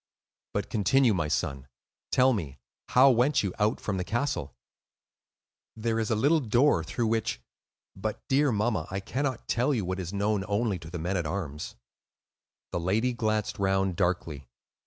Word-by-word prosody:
"But 100 -1 -2
continue, 115 +3 +3
my 80 -5 0
son; 70 -3 -2 0.4
tell 130 +1 +5
me, 75 - -4 0.3
how 135 +2 +6
went 125 +3 +3
you 95 -3 -2
out 105 +1 +2
from 100 -3 -2
the 90 - -1
castle?" 100 - -2 1.2
"There 115 0 -1
is 110 - -1
a 110 - +2
little 145 +9 +3
door 120 - +3
through 115 +8 -2
which—but 110 - -4
dear 140 +1 +3
mamma, 105 -6 0
I 95 - -3
cannot 130 +4 -3
tell 130 +4 +1
you 105 -6 -1
what 95 +1 -3
is 90 -2 -4
known 100 0 0
only 105 -2 0
to 80 -1 -10
the 90 - -5
men 90 +4 -1
at 85 -3 -1
arms." 75 -5 -4 1.0
The - - -1
lady 110 +9 +1
glanced 110 -4 -1
round 95 -1 +1
darkly. 85 -7 -1
105 Hz, 160 wpm, -28 LUFS, 90-120 Hz, 1.2 s, how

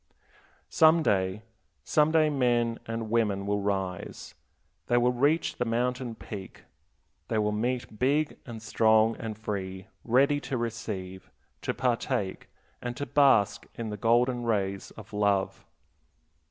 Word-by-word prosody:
Some 160 +1 +5
day, 95 -2 0 0.4
some 150 0 +3
day 155 -1 +4
men 120 -4 +1
and 115 -1 -4
women 105 -4 +1
will 100 0 0
rise, 95 -3 -3 0.5
they 120 - +3
will 120 +1 +3
reach 145 +6 +1
the - - 0
mountain 125 +1 -1
peak, 100 -3 -9 0.6
they 110 - -1
will 105 0 +1
meet 120 +1 -2
big 145 +4 +1
and 115 -2 -8
strong 110 0 +3
and 110 -2 -5
free, 95 -2 -5
ready 140 +5 +3
to 135 - -3
receive, 105 -5 -5 0.3
to - - -2
partake, 120 -5 -1 0.3
and 120 0 -5
to 145 - -3
bask 135 -9 +3
in 115 -2 -4
the - - -3
golden 120 +3 +2
rays 100 -4 -1
of 105 -1 -12
love. 100 -2 0
115 Hz, 135 wpm, -28 LUFS, 105-125 Hz, 0.6 s, Some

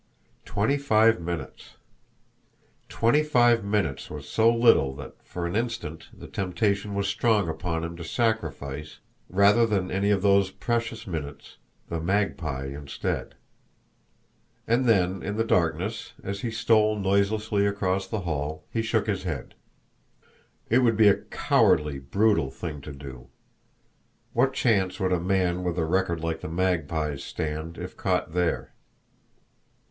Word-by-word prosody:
Twenty 110 +8 +1
five 115 -7 +4
minutes! 85 -5 -6 1.1
Twenty 120 +7 +3
five 120 -6 +3
minutes 100 -9 -1
was 75 -2 -8
so 115 +1 +4
little 115 - +4
that 70 -1 -9
for 90 -1 -5
an 85 +3 -3
instant 115 -9 -3
the - - -12
temptation 100 +1 -1
was 100 0 0
strong 105 -2 +2
upon 80 0 -3
him 85 0 -5
to 85 - -7
sacrifice, 80 - -2 0.3
rather 100 +5 +5
than 100 -5 0
any 100 +2 +1
of 100 -2 +2
those 100 -1 +4
precious 115 +3 -3
minutes, 80 -7 -7 0.3
the 85 - -3
Magpie 85 -7 -1
instead! 70 +1 -4 1.3
And 120 +3 +2
then 95 -4 +2
in 100 +2 -4
the 115 - +2
darkness, 90 +2 0
as 100 +1 -4
he 120 - -2
stole 110 -2 +3
noiselessly 100 +1 +1
across 95 -1 -1
the 105 +1 -3
hall, 80 -3 -3
he 115 - 0
shook 110 -2 0
his 100 -3 -1
head. 80 -9 -5 1.1
It 120 - +4
would 115 -4 +3
be 110 -2 +7
a - - +5
cowardly, 75 -2 +2
brutal 95 +2 +2
thing 75 0 -6
to 75 - -8
do. 70 -3 -10 1.1
What 130 +3 +2
chance 95 -8 +1
would 95 -1 +1
a 90 - +1
man 90 0 0
with 90 -1 -2
a 80 - +1
record 85 -1 0
like 80 -1 -3
the - - -5
Magpie's 80 -5 -1
stand 80 +2 -4
if - - -7
caught - - -1
there? 90 -2 -1
95 Hz, 140 wpm, -26 LUFS, 80-110 Hz, 1.3 s, be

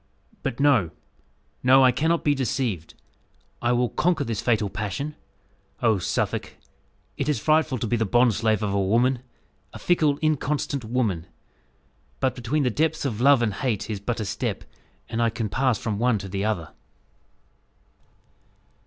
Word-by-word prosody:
"But 135 -2 -3
no 135 - +4 0.7
no, 130 +1 +6
I 130 - +6
cannot 160 +6 +1
be 145 - +3
deceived. 120 - -2 0.7
I 120 - +1
will 120 0 +2
conquer 175 -3 +1
this 115 -5 -3
fatal 110 -4 +1
passion. 105 +9 -4 0.6
Oh, 110 -4 +2
Suffolk! - - -2 0.6
it 140 - -1
is 150 - +1
frightful 155 +2 +2
to 115 - -3
be 120 +2 0
the 110 - +1
bondslave 110 -2 +2
of 100 -2 -1
a 100 - +1
woman 120 +6 +2 0.5
a - - -7
fickle, 155 -5 +2
inconstant 150 -2 0
woman. 110 -8 -1 0.9
But 130 -1 +1
between 130 +5 -1
the 125 - +1
depths 160 +4 0
of 115 -4 -2
love 140 -2 +5
and 110 -4 0
hate 110 0 -2
is 105 - -3
but 115 +4 -3
a 110 - -2
step; 95 - -3 0.4
and 115 0 -2
I 115 - +3
can 115 -2 -3
pass 130 +2 +1
from 105 -1 -3
one 120 -1 +2
to 100 -1 -7
the 100 +1 -2
other." 90 -8 -2
120 Hz, 160 wpm, -24 LUFS, 105-135 Hz, 0.9 s, no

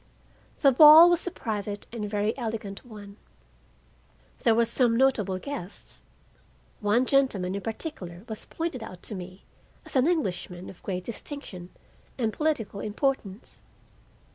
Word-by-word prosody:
The 275 - +6
ball 310 +5 +10
was 345 +1 +1
a - - +2
private 205 - -4
and 210 -3 -4
very 210 +1 0
elegant 220 -5 -5
one. 205 -4 -12 1.2
There 230 - +3
were 235 0 +4
some 235 -1 +2
notable 220 -8 +2
guests. 205 -4 -7 0.8
One 215 +5 +2
gentleman 250 -10 +2
in 200 - -3
particular 205 - -6
was 220 -2 -6
pointed 325 -7 -4
out 185 -5 -9
to - - -3
me 185 0 -8 0.4
as - - -5
an 260 +2 +4
Englishman 185 - -2
of 180 - -18
great 185 -2 -4
distinction 225 -7 -7 0.5
and 225 -4 -1
political 265 -10 -1
importance. 215 -1 -3
220 Hz, 135 wpm, -27 LUFS, 195-270 Hz, 1.2 s, ball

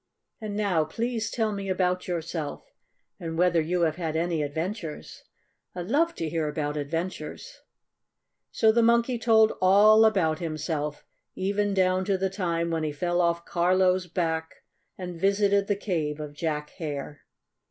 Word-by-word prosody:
"And 210 -2 -4
now 200 -6 +1
please 225 +6 -2
tell 220 -2 0
me 200 -1 -4
about 180 -1 0
yourself 165 -3 -4 0.5
and 165 -1 -5
whether 175 -1 +3
you 175 +3 -1
have 160 -1 +1
had 160 -3 -3
any 165 -1 0
adventures. 160 +3 -5 0.5
I 175 - -4
love 325 - +1
to 165 - -3
hear 160 -1 -1
about 150 0 -2
adventures." 165 - -5 0.9
So 220 - +3
the 235 +2 +3
Monkey 235 +1 +3
told 220 -1 +4
all 210 +4 +6
about 180 -8 +2
himself, 155 -2 -3 0.3
even 200 +1 0
down 185 0 +2
to 195 -1 +1
the 190 0 -1
time 170 -3 -1
when 165 -1 -1
he 155 -1 -1
fell 175 +4 0
off 170 0 0
Carlo's 180 +1 +2
back 160 -2 -1 0.5
and 180 -2 -7
visited 200 0 +2
the 205 - +1
cave 160 -7 -2
of 150 -1 -6
Jack 150 -1 -3
Hare. 145 -2 -5
180 Hz, 150 wpm, -26 LUFS, 160-200 Hz, 0.9 s, all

